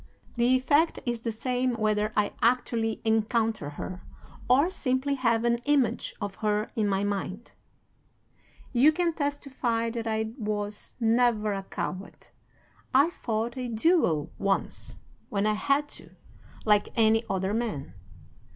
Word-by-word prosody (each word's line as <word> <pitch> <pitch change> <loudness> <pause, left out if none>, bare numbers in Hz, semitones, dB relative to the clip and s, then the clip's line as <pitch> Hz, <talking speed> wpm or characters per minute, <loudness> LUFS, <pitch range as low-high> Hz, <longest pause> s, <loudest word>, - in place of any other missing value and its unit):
The 240 +1 +3
effect 290 +5 +3
is 240 -2 -2
the 230 - -2
same 250 +2 -1
whether 215 -1 +1
I 205 -1 +2
actually 230 -2 +1
encounter 220 -5 +1
her, 180 +5 -7 0.5
or 280 +8 +4
simply 260 -3 0
have 230 -4 +1
an 235 0 +2
image 270 -6 +1
of 205 -3 -4
her 210 0 0
in 215 -3 +1
my 195 0 +1
mind. 200 +1 -3 1.2
"'You 265 +5 +6
can 335 +1 0
testify 265 -6 -1
that 230 -1 -4
I 220 0 -1
was 210 -1 -3
never 225 -2 +2
a 195 - -3
coward. 190 0 -6 0.7
I 285 +6 +5
fought 230 -4 -3
a 250 -1 -3
duel 225 - +2
once, 195 -1 -1 0.3
when 200 0 0
I 215 - +3
had 280 +7 +1
to, - - -10 0.6
like 210 -1 +3
any 225 0 +4
other 190 0 -1
man. 220 -12 -3
225 Hz, 135 wpm, -27 LUFS, 210-255 Hz, 1.2 s, You